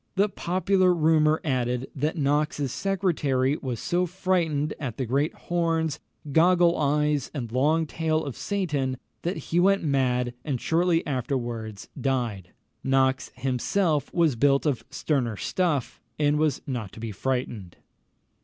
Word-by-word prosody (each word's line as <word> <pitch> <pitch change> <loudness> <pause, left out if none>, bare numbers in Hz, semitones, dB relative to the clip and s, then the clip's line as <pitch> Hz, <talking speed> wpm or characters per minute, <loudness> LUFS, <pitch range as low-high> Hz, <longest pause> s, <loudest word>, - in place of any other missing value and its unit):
The 200 +2 +3
popular 185 0 +2
rumour 155 -1 +3
added, 125 -3 -1
that 150 +5 -1
Knox's 145 -1 0
secretary 150 -9 0
was 125 -5 -4
so 180 +1 0
frightened 170 -5 0
at 130 -7 -4
the 130 - -1
great 140 +6 +1
horns, 165 -3 -1 0.3
goggle 175 +2 +5
eyes, 150 0 +1
and 120 -5 -4
long 150 +6 +2
tail 160 0 -1
of 140 - -5
Satan, 150 -10 -1 0.2
that 175 +3 -2
he 170 - -1
went 195 +1 +3
mad, 125 -4 +1
and 135 -5 -2
shortly 165 +3 +1
afterwards 120 -6 -3
died. 120 -9 -1 0.3
Knox 135 0 +2
himself 140 - 0
was 165 -6 +2
built 140 +4 +3
of 140 -5 0
sterner 125 -8 -1
stuff, 160 - -1 0.2
and 150 0 +2
was 155 -2 +1
not 120 -8 -4
to - - -10
be 115 -1 -4
frightened. 115 -5 -3
145 Hz, 135 wpm, -26 LUFS, 130-165 Hz, 0.3 s, goggle